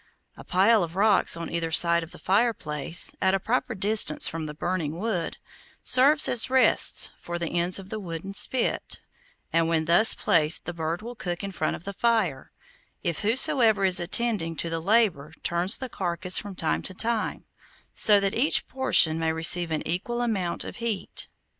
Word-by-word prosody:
A - - -13
pile 205 +4 +2
of 170 -1 -5
rocks 200 -3 +2
on 170 0 -7
either 165 -1 -3
side 170 +1 +4
of 165 - -9
the - - -11
fireplace, 185 -7 0
at 190 0 +2
a - - -1
proper 245 +3 -2
distance 200 -5 +1
from 160 -1 -5
the 150 - -8
burning 165 -1 -3
wood, 195 -5 -3 0.5
serves 280 +4 +4
as 240 +1 +3
rests 260 0 +2
for 175 0 -6
the 170 -2 -4
ends 175 +1 0
of 195 -1 -10
the 220 - -5
wooden 180 0 -7
spit, 240 +4 +1 0.5
and 165 0 +2
when 160 -1 0
thus 175 +7 +5
placed 155 -1 +1
the 175 - -5
bird 165 +3 -4
will 240 +2 -7
be 230 - -27
cooked 175 +1 -4
in 200 - -5
front - - -3
of - - -12
the 200 - -7
fire, 200 - -1 0.5
if 170 -2 -3
whosoever 220 -2 +3
is 185 -1 +3
attending 175 -2 0
to 165 +1 -4
the 165 - -2
labor 195 -7 0
turns 175 +4 0
the 260 - -6
carcass 180 -3 0
from 200 -2 -9
time 80 - -2
to 185 - -4
time, 225 +2 -2 0.5
so 210 -2 +5
that 195 -1 -1
each 270 +7 +2
portion 245 -11 +3
may 160 0 -1
receive 165 +2 +4
an 155 -1 -4
equal 240 +8 -3
amount 195 -7 -2
of - - -9
heat. 230 -5 -4
185 Hz, 185 wpm, -25 LUFS, 165-220 Hz, 0.5 s, thus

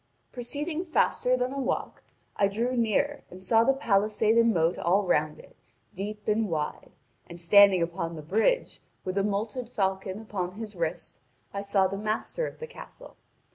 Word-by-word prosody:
Proceeding 295 +7 -4
faster 255 -6 +1
than 250 +1 -1
a 275 - -3
walk, 265 -1 -2 0.3
I 200 - +3
drew 235 +6 -1
near 240 +5 +1
and 185 +1 -12
saw 225 +3 +4
the 270 - +4
palisade 215 -2 +2
and 230 0 +5
moat 165 -3 +1
all 190 +4 +2
round 155 -3 +1
it, - - -16 0.4
deep 210 +2 -6
and 215 0 +1
wide, 155 -3 -3 0.4
and 170 0 -10
standing 195 0 +6
upon 170 0 -3
the 155 - -8
bridge, 220 - +1 0.2
with 185 0 -3
a 200 - +2
moulted 210 +4 -2
falcon 190 -2 -2
upon 190 -5 -4
his 215 0 -7
wrist, 165 -2 -4 0.3
I 200 - -3
saw 200 -1 +2
the 195 +1 -2
master 220 - -2
of - - -10
the 475 - -6
castle. 485 +1 -12
210 Hz, 175 wpm, -27 LUFS, 185-235 Hz, 0.4 s, standing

